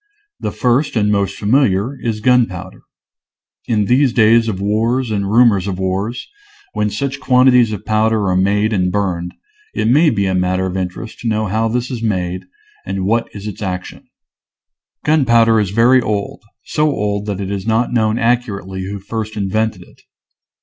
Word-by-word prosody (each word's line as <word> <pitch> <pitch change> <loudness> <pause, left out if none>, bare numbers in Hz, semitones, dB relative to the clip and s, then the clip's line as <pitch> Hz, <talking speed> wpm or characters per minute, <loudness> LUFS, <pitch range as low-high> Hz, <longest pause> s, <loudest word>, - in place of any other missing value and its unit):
The - - -3
first 125 +4 0
and 105 -2 +2
most 100 -1 0
familiar 110 +1 +1
is 110 -2 -3
gunpowder. 105 -7 0 0.9
In 105 -3 +1
these 130 +4 +3
days 115 0 +4
of 100 -4 -2
wars 115 +4 0
and 100 -2 -1
rumors 110 -4 +4
of 95 -2 -3
wars, 95 +5 -3 0.5
when 105 -1 0
such 135 +6 -3
quanti 130 -1 +4
ties 120 -3 +4
of 105 - -6
powder 110 -1 +1
are 90 - +1
made 105 +4 +1
and 90 -2 +1
burned, 90 -4 -2 0.4
it - - 0
may 150 +7 +4
be 100 -7 0
a 95 - 0
matter 90 0 0
of 95 0 -4
interest 95 +4 -5
to 120 - -5
know 110 -1 0
how 110 +3 0
this 125 +3 -2
is 120 -3 -4
made 90 -4 -2 0.4
and 95 0 -3
what 115 +3 0
is 100 0 -8
its 105 -1 -7
action. 90 -2 -6 1.0
Gunpowder 120 -7 +4
is 105 -3 0
very 120 +5 +4
old, 105 -3 -3 0.2
so 150 0 0
old 105 -5 -2
that 100 -2 -3
it 100 0 -4
is 100 +1 -4
not 115 +2 +1
known 110 -1 +1
accurately 100 -6 -1
who 100 +2 -5
first 110 +2 -5
invented 105 -1 -1
it. - - -22
110 Hz, 175 wpm, -17 LUFS, 95-115 Hz, 1.0 s, days